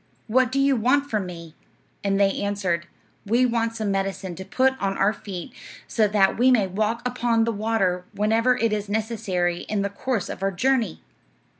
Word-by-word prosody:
What 250 +2 +2
do 275 - 0
you 275 0 +4
want 270 +5 +1
from 210 -4 -1
me?' 170 -3 -9 0.5
And 195 0 +1
they 195 -1 +2
answered, 190 -4 -1 0.4
'We 240 +4 +3
want 230 -1 0
some 215 -3 -1
medicine 195 -1 -2
to 190 - -6
put 260 +6 +2
on 195 0 -1
our 200 +2 +3
feet, 190 -4 -8 0.3
so 220 -2 +2
that 205 0 +2
we 255 +2 +5
may 235 -6 +4
walk 215 +5 -1
upon 240 -2 +1
the 230 - +1
water 200 -4 0
whenever 225 +4 +2
it 230 -3 +1
is 205 -1 -3
necessary 200 -5 -1
in 210 -2 0
the 200 - -2
course 225 0 -2
of - - -7
our 195 - +1
journey.' 235 -1 0
210 Hz, 185 wpm, -24 LUFS, 195-235 Hz, 0.5 s, we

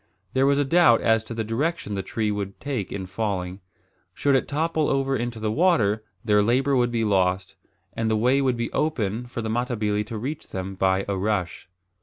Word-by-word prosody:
There 135 +1 +3
was 140 0 +3
a 145 - +2
doubt 165 -5 +5
as 110 -1 +3
to 115 - -7
the 110 - -1
direction 140 +4 -2
the 100 - -1
tree 105 +3 -2
would 100 -1 -4
take 130 -9 -3
in 95 -2 -4
falling. 95 -1 -3 0.6
Should 140 - +2
it 135 - +2
topple 155 +1 0
over 135 0 +1
into 120 -2 -3
the 110 0 -1
water, 110 - +2 0.2
their 105 -2 +4
labour 130 +6 +2
would 120 -1 +3
be 115 -1 -1
lost, 95 -2 +1 0.4
and 115 -1 -1
the 110 - +2
way 125 +5 +3
would 130 -3 +1
be 115 0 -2
open 120 -6 -1
for 120 -1 -5
the 110 - -3
Matabili 110 -3 0
to 115 - -5
reach 145 +8 -5
them 95 +1 -5
by 95 0 +1
a 100 - -1
rush. 95 -3 -2
115 Hz, 205 wpm, -24 LUFS, 100-135 Hz, 0.6 s, doubt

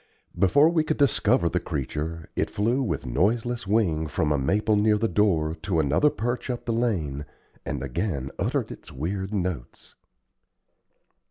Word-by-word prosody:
Before 100 - +5
we 165 -1 +2
could 155 - -1
discover 130 - +3
the 90 - 0
creature, 80 +1 -4
it - - 0
flew 115 +6 0
with 85 - -2
noiseless 110 - 0
wing 90 -7 +1
from 75 0 0
a 75 - +2
maple 105 +10 +2
near 105 +1 +3
the 115 +2 +1
door 85 -6 +2
to 85 -1 0
another 75 - +3
perch 120 +1 -3
up 120 -1 -3
the 115 - 0
lane, 85 - -1 0.4
and 70 -3 -3
again 70 - -2
uttered - - -1
its - - -11
weird 95 +7 -3
notes. 90 - -4
95 Hz, 155 wpm, -26 LUFS, 75-115 Hz, 0.4 s, Before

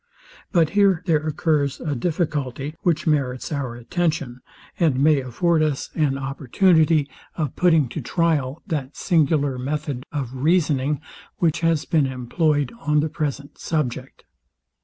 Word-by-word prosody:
But 165 -5 +3
here 195 -4 +3
there 155 -3 +1
occurs 150 -2 0
a 150 - -2
difficulty, 145 -2 -2
which 170 -3 +1
merits 140 -5 0
our 135 -5 -3
attention, 145 -1 -2 0.4
and 155 -7 +2
may 150 +1 +4
afford 160 +6 +1
us 150 -3 -1
an 145 -4 +1
opportunity 150 +3 +2 0.3
of 155 -4 -3
putting 165 -6 +3
to 155 - -5
tryal 155 -1 0
that 150 -8 -4
singular 145 -6 +1
method 145 0 -3
of 135 -5 -4
reasoning, 150 -2 +1 0.4
which 165 -1 +1
has 165 -2 +1
been 150 -4 +2
employed 145 - 0
on 150 -7 +2
the 155 - -1
present 145 -2 -4
subject. 150 -7 -3
150 Hz, 135 wpm, -22 LUFS, 135-165 Hz, 0.4 s, may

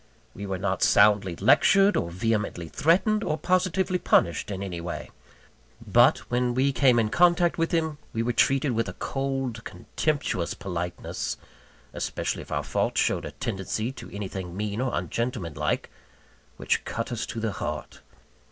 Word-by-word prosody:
We 100 +1 -7
were 95 -1 -2
not 95 +1 -2
soundly 100 -4 +4
lectured, 195 - +5
or 85 - 0
vehemently 105 -2 -1
threatened, 180 - +2
or 155 - -1
positively 185 +1 +1
punished 85 - +2
in 100 -1 -4
anyway; 85 -3 -5 0.7
but, - - +5
when 125 0 +1
we 135 +2 +3
came 130 -3 +4
in 110 -2 +2
contact 175 +1 +3
with 165 - +1
him, 160 -3 0
we 115 - -1
were 120 +1 0
treated 135 +3 +2
with 115 -1 -1
a - - -6
cold, 135 -4 -3
contemptuous 100 - -2
politeness 90 -2 -4 0.6
(especially - - -3
if - - -13
our - - -1
fault - - -1
showed - - +1
a - - -6
tendency 110 +5 -3
to - - -10
anything 95 -3 -6
mean 105 +2 -2
or 130 - 0
ungentlemanlike) 115 - -2 0.7
which - - 0
cut 115 +1 -4
us 120 -1 -3
to 115 - -5
the 110 -1 -1
heart. 75 -4 -5
115 Hz, 150 wpm, -26 LUFS, 95-140 Hz, 0.7 s, lectured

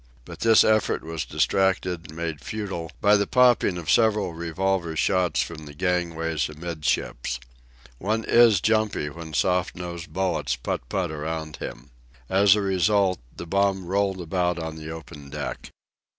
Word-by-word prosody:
But - - -10
this 115 -1 +6
effort 110 -1 +2
was 80 -1 -4
distracted 90 -3 0
and 80 - -12
made 80 -3 -4
futile 95 -7 -5
by 105 0 +5
a 100 -1 +3
popping 125 -7 +4
of 85 - -2
several 105 -5 +3
revolver 85 +1 -1
shots 90 +2 +2
from 80 -3 -9
the 70 - -11
gangways 85 -3 -1
amidships. 75 -6 -2 0.6
One 110 +4 -1
is 115 -6 +5
jumpy 110 -9 +1
when 80 -1 -8
soft 90 +7 +1
nosed 85 -1 -7
bullets 95 -9 0
putt - - -4
putt 90 -4 -1
around 80 0 -4
him. - - -8 0.4
As 100 +1 +6
a 105 - 0
result, 95 -1 +2 0.2
the - - -6
bomb 95 +1 +1
rolled 95 0 0
about 90 +1 0
on 80 -1 -5
the 80 0 -8
open 75 -3 -9
deck. 75 0 -5
90 Hz, 150 wpm, -25 LUFS, 80-100 Hz, 0.6 s, this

